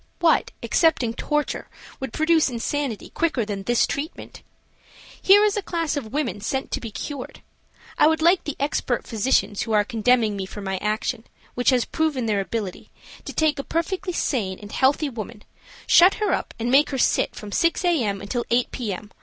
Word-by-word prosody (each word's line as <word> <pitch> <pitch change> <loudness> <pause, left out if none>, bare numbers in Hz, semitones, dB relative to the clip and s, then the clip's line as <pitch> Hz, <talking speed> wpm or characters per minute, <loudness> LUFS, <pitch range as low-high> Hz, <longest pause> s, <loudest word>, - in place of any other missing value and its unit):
What, 335 -2 +3
excepting 270 -9 +2
torture, 295 +4 -2 0.3
would 265 -3 -5
produce 315 +1 +3
insanity 250 0 -3
quicker 315 -9 0
than 205 -2 -4
this 240 +4 +2
treatment? 300 +5 -6 0.8
Here 405 +2 +6
is 420 0 +1
a 415 - -1
class 335 -5 -2
of 240 -7 -5
women 260 -7 -2
sent 265 +5 -3
to - - -2
be 230 - -5
cured. 270 +5 -7 0.6
I - - +7
would 320 0 +2
like 340 +3 +4
the 295 - -4
expert 275 -3 -1
physicians 210 -3 +1
who 225 - -2
are 210 -1 +4
condemning 230 -1 +2
me 190 -1 -4
for 205 - -9
my 190 -1 -3
action, 215 +2 -2 0.3
which 245 - +2
has 250 -3 +3
proven 305 -6 -1
their 210 -3 +1
ability, 200 -2 -5 0.4
to - - -6
take 305 -2 +1
a - - -2
perfectly 365 +5 -2
sane 215 - -1
and 205 0 -11
healthy 280 +3 +2
woman, 225 -3 -7 0.4
shut 360 +3 +6
her 425 - 0
up - - -3
and 235 +1 -2
make 285 +3 +5
her 270 - -3
sit - - +1
from 210 -1 -8
6 335 - +1
A. 340 -7 +2
M. 200 -2 -2
until 235 +4 -2
8 240 +1 +1
P. 235 -6 -3
M. 205 +3 -7
250 Hz, 190 wpm, -23 LUFS, 215-315 Hz, 0.8 s, I